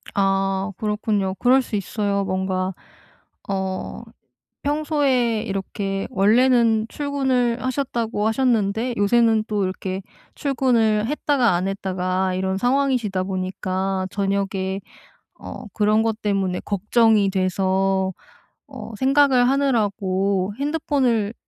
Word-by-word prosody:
아 195 0 +1
그렇군요. 210 -2 -1
그럴 250 +7 +4
수 240 - -5
있어요. 200 0 -1
뭔가 185 0 -1 0.8
어 190 -1 -3 0.6
평소에 280 -7 +1
이렇게 195 0 -3
원래는 230 +1 +3
출근을 265 -4 0
하셨다고 240 -5 -1
하셨는데 225 -1 +1
요새는 220 +1 +3
또 210 -2 0
이렇게 185 0 -3 0.3
출근을 230 -6 +1
했다가 280 -4 +1
안 180 +2 -1
했다가 185 -1 -1
이런 190 +1 -1
상황이시다 245 -5 +1
보니까 185 0 -2
저녁에 195 -1 -1 0.6
어 - - -8
그런 215 +1 +3
것 225 -1 -1
때문에 195 -3 0
걱정이 210 0 +2
돼서 190 0 0 0.6
어 - - -9
생각을 265 -1 +4
하느라고 200 -7 0
핸드폰을 270 -8 0
210 Hz, 245 characters per minute, -22 LUFS, 190-245 Hz, 0.8 s, 그럴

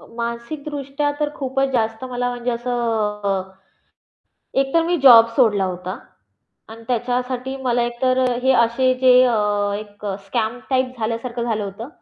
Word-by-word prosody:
अ, - - -16
मानसिकदृष्ट्या 275 +4 -3
तर 295 0 0
खूपच 270 0 -1
जास्त 225 -1 -1
मला 245 0 -1
म्हणजे 245 0 -3
असं 215 -5 -2 1.1
एकतर 300 +5 +1
मी 350 +1 +1
जॉब 230 -4 +9
सोडला 210 -7 +3
होता 185 0 -5 0.7
आणि 225 +1 -11
त्याच्यासाठी 250 +2 -2
मला 245 -1 +1
एक 240 0 -4
तर 255 0 +2 0.2
हे 265 0 +4
असे 255 +3 +1
जे 255 -1 +7
अ, 245 -2 +2 0.4
एक 205 -1 -10 0.2
स्कॅम 225 +2 -2
टाइप 255 -1 0
झाल्यासारखं 230 +2 -3
झालं 220 -3 -1
होतं, 200 +6 -7
240 Hz, 140 wpm, -21 LUFS, 225-260 Hz, 1.1 s, जॉब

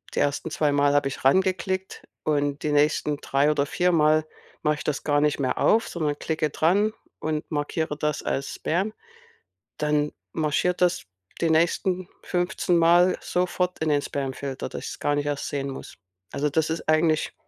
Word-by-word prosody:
die - - +1
ersten 145 +2 0
zweimal 145 -2 +2
habe 145 -1 +2
ich 135 - -8
reingeklickt 190 +4 +1 0.2
und 145 -1 0
die 150 - 0
nächsten 150 0 +2
drei 140 +1 +1
oder 145 -2 +1
viermal 155 -2 +3 0.4
mache 150 0 +2
ich - - -7
das 150 -3 -2
gar 145 -1 +2
nicht 150 0 +1
mehr 130 -2 0
auf, 225 +1 +3
sondern 150 -4 -2
klicke 155 -1 -1
dran 200 +9 +2 0.3
und 155 -1 -3
markiere 150 0 -2
das 150 -1 -1
als 135 +1 -2
Spam, 190 +6 -1 0.8
dann 150 0 +1 0.2
marschiert 160 +4 0
das 180 -1 +2 0.4
die 165 - +2
nächsten 180 +3 +1
fünfzehnmal 175 0 +3
sofort 180 0 -1
in 160 - 0
den 145 -1 +2
Spamfilter, 135 -1 -4
dass - - -7
ich - - -4
es - - -9
gar 145 - +1
nicht 145 0 -1
erst 145 -1 -2
sehen 140 -1 -3
muss. 135 - -8 0.4
Also, 150 +1 0
das 160 +2 0
ist 165 - -4
eigentlich 155 0 +2
150 Hz, 170 wpm, -25 LUFS, 145-175 Hz, 0.8 s, viermal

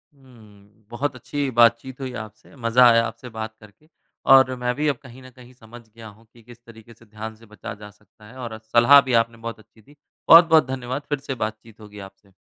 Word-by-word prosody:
हुँ। 110 -5 -21
बहुत 135 +3 -4
अच्छी 140 +3 -4
बातचीत 120 +2 +2
हुई 130 -1 -6
आपसे। 110 - -20
मज़ा 120 0 +3
आया 115 0 +4
आपसे 125 - -9
बात 110 -1 -7
करके। 105 +9 -21 0.5
और 130 -1 +4
मैं 125 0 -1
भी 150 +3 -2
अब 140 -3 0
कहीं 130 0 -14
न 130 - -13
कहीं 125 0 -18
समझ 120 0 -15
गया 110 +1 -13
हूँ 115 +2 -24
कि 115 - -20
किस 120 +1 -16
तरीके 115 0 -16
से 115 - -22
ध्यान 110 +1 -9
से 115 +1 -20
बचा 105 +1 -10
जा 105 0 -13
सकता 105 +1 -24
है 120 +4 -15
और 120 -3 -7
सलाह 120 +5 +6
भी 130 -2 -4
आपने 115 0 -9
बहुत 115 0 -8
अच्छी 110 +1 -23
दी। 145 +7 -22 0.3
बहुत-बहुत 165 -3 +7
धन्यवाद। 130 +1 -5
फ़िर 145 -2 -2
से 135 -1 -6
बातचीत 110 0 -11
होगी 105 -1 -13
आपसे। 95 0 -30
115 Hz, 215 wpm, -22 LUFS, 110-130 Hz, 0.5 s, बहुत-बहुत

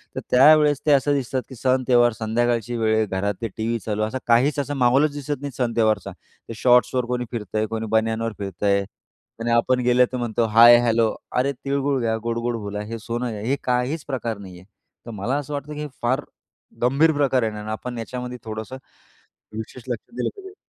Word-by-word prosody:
तर - - -2
त्यावेळी 150 +3 +6
ते 150 - +4
असं 140 +1 +3
दिसतात 130 -1 -1
की 130 - -9
सण, 130 +1 +1
त्यौहार 120 -1 +5
संध्याकाळची 120 +1 0
वेळ 110 -1 +2
आहे, 110 0 +2
घरात 100 +1 -2
ते 115 - -1
टीव्ही 115 +1 -1
चालू. 105 -1 -1
असं 110 +4 -2
काहीच 130 +5 +3
असं 145 +1 -2
महोलच 135 +4 +3
दिसत 145 -1 -4
नाही 145 -1 -5
सण 120 -3 0
त्यौहारचा. 110 -2 +1 0.4
ते - - -4
शॉर्ट्सवर 125 +1 +3
कोणी 125 0 -2
फिरत 110 -3 -6
आहे, 110 0 +2
कोणी 110 0 -4
बनियानवर 110 0 0
फिरत 95 -3 -6
आहे 100 -1 +3 0.6
आणि 115 +1 -1
आपण 120 +2 +3
गेलं 125 +1 +4
तर 130 - -3
म्हणतो 120 -1 -1
हाय, 115 +2 +8
हेलो. 115 -1 +2 0.2
अरे, 130 +2 +1
"तिळगूळ 140 +1 -1
घ्या 115 -1 0
गोड-गोड 115 +1 -2
बोला, 105 -1 -5
हे 115 +2 -6
सोनं 120 +2 -3
घ्या." 105 -2 -6
हे 125 +6 0
काहीच 125 +5 -1
प्रकार 120 -6 -3
नाहीये. 90 -3 -11 0.4
तर 115 - -7
मला 115 +7 -2
असं 145 0 -5
वाटतं 145 +1 -5
की 150 - -7
हे 150 - -4
फार 130 +4 +1 0.6
गंभीर 140 +6 +4
प्रकार 135 -4 +2
आहे 110 - 0
आणि 105 +1 -7
आपण 120 +2 -5
याच्यामध्ये 125 +2 -6
थोडंसं 110 +3 -6 0.8
विशेष 110 +3 -7
लक्ष 120 - -6
दिलं - - 0
पाहिजे. 385 -1 -11
120 Hz, 200 wpm, -23 LUFS, 110-130 Hz, 0.8 s, हाय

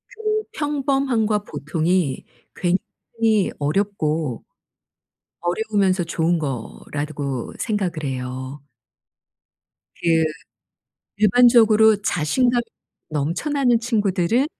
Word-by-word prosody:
그 430 -1 -1
평범함과 270 -7 0
보통이 155 -1 -1 0.3
굉장히 210 +3 0
어렵고, 155 - -1 1.0
어려우면서 190 0 +1
좋은 170 +1 0
거라고 140 0 -4
생각을 190 -8 -2
해요. 130 +1 -5 1.4
그 165 -1 +3 0.9
일반적으로 220 0 +5
자신감이 240 - +1 0.5
넘쳐나는 230 - +1
친구들은 220 +1 +1
190 Hz, 195 characters per minute, -22 LUFS, 155-230 Hz, 1.4 s, 일반적으로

